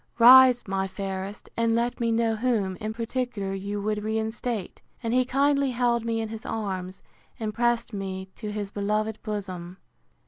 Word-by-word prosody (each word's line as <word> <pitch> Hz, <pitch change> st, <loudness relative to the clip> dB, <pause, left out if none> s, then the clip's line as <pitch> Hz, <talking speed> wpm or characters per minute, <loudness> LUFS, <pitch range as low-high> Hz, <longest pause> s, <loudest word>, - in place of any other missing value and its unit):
Rise, 250 Hz, 0 st, +8 dB
my 195 Hz, 0 st, -1 dB
fairest, 195 Hz, +1 st, -5 dB
and 230 Hz, 0 st, +2 dB
let 240 Hz, +1 st, 0 dB
me 230 Hz, -1 st, +1 dB
know 225 Hz, 0 st, +2 dB
whom, 215 Hz, -5 st, 0 dB
in 215 Hz, 0 st, -4 dB
particular, 230 Hz, -3 st, -3 dB
you 200 Hz, +1 st, -3 dB
would 210 Hz, 0 st, -1 dB
reinstate; 220 Hz, -1 st, -3 dB, 0.2 s
and 230 Hz, 0 st, -1 dB
he 255 Hz, 0 st, +3 dB
kindly 280 Hz, +1 st, +2 dB
held 240 Hz, -2 st, +1 dB
me 230 Hz, -1 st, 0 dB
in 220 Hz, -, -4 dB
his 220 Hz, 0 st, -7 dB
arms, 190 Hz, -4 st, -4 dB, 0.4 s
and 215 Hz, -2 st, -3 dB
pressed 240 Hz, 0 st, +1 dB
me 190 Hz, -1 st, -4 dB
to 215 Hz, -2 st, -6 dB
his 205 Hz, -1 st, -4 dB
beloved 210 Hz, +1 st, -1 dB
bosom. 185 Hz, -4 st, -5 dB
220 Hz, 165 wpm, -26 LUFS, 200-235 Hz, 0.4 s, Rise